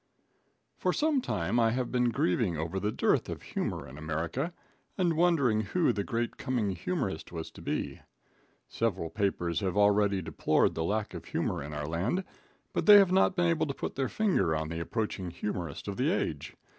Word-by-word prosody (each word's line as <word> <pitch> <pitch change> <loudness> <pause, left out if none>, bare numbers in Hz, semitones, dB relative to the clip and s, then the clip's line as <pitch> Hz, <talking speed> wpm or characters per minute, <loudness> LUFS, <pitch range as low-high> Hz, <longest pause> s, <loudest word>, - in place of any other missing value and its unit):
For - - +1
some 300 -3 +2
time 120 - 0
I 115 -1 +4
have 125 -1 -2
been 125 -1 +2
grieving 90 -4 +1
over 80 +5 -2
the 105 +2 -1
dearth - - +1
of - - -6
humor - - -3
in 70 +4 -10
America, 80 - -2 0.5
and 175 -3 +2
wondering 150 -10 +3
who 155 - +1
the 100 - -1
great 115 +3 -2
coming 125 -6 -1
humorist 95 - -3
was 80 -2 -6
to - - -13
be. - - -3 0.7
Several 95 -8 -1
papers 90 -4 0
have 95 -1 -2
already 100 -1 +4
deplored - - +2
the 80 - -2
lack 105 +4 -1
of - - -7
humor - - -2
in 70 +1 -6
our 75 0 -4
land, 95 - -1 0.5
but - - -1
they 205 -1 +11
have 195 -3 +5
not 190 0 +4
been 175 - +2
able 165 -2 +2
to 140 - -3
put - - -4
their 135 -2 -1
finger 140 - +1
on 80 0 -2
the 85 0 -4
approaching 95 0 -3
humorist 85 -3 -5
of - - -4
the - - +2
age. 75 - -2
105 Hz, 190 wpm, -30 LUFS, 85-135 Hz, 0.7 s, they